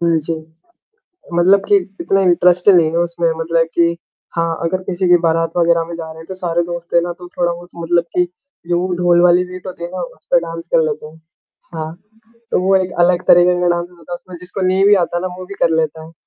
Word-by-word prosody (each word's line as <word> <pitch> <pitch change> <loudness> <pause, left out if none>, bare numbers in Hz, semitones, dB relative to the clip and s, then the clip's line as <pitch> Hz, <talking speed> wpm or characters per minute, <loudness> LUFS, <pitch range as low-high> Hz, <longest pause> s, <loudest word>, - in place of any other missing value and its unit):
हुँ, 170 -1 +2
जी। 160 +2 -3 1.0
मतलब 185 +3 +4
कि 205 - +5 0.3
इतना 195 +3 +1
इंटरेस्ट 180 0 +3
नहीं 170 -5 +5
है 165 - -1
उसमें 170 0 0
मतलब 165 0 0
कि 170 0 +2 0.4
हाँ, 165 -1 0
अगर 185 +3 -1
किसी 185 0 -2
के 175 0 +6
बारात 165 -1 +1
वग़ैरह 170 -1 +3
में 170 - -8
जा 165 -1 -6
रहे 160 - -10
हैं, 160 - -11
तो 190 - -6
सारे 175 -2 -1
दोस्त 170 0 -7
रहे 170 - +5
ना, 175 - -3
तो 175 0 -12
थोड़ा 175 -1 +1
वो 175 +1 -8
मतलब 170 0 +1
कि 180 0 +2 0.4
जो 175 0 +1
वो 180 0 -1
ढोल 175 0 +3
वाली 180 0 +5
बीट 180 0 -10
होती 180 -2 -7
है 170 - -4
ना, 185 0 -5
उस 170 -2 -9
पे 175 - +6
डांस 165 0 -7
कर 165 - +5
लेते 155 0 -4
हैं। 160 +1 -16 0.6
हाँ, 160 -1 -4 0.6
तो - - +2
वो 190 +1 +3
एक 185 -1 +1
अलग 175 +1 +3
तरीके 175 0 +5
का 180 - +2
डांस 175 0 -3
होता 170 0 -15
है - - -1
उसमें 180 +1 -12
जिसको 180 +2 -6
नहीं 190 +1 +2
भी 205 0 +6
आता 175 0 -2
ना 185 - -2
वो 185 - -8
भी 200 - -9
कर - - +4
लेता 160 0 -1
है - - -10
वो। 165 - -17
175 Hz, 245 wpm, -17 LUFS, 165-180 Hz, 1.0 s, के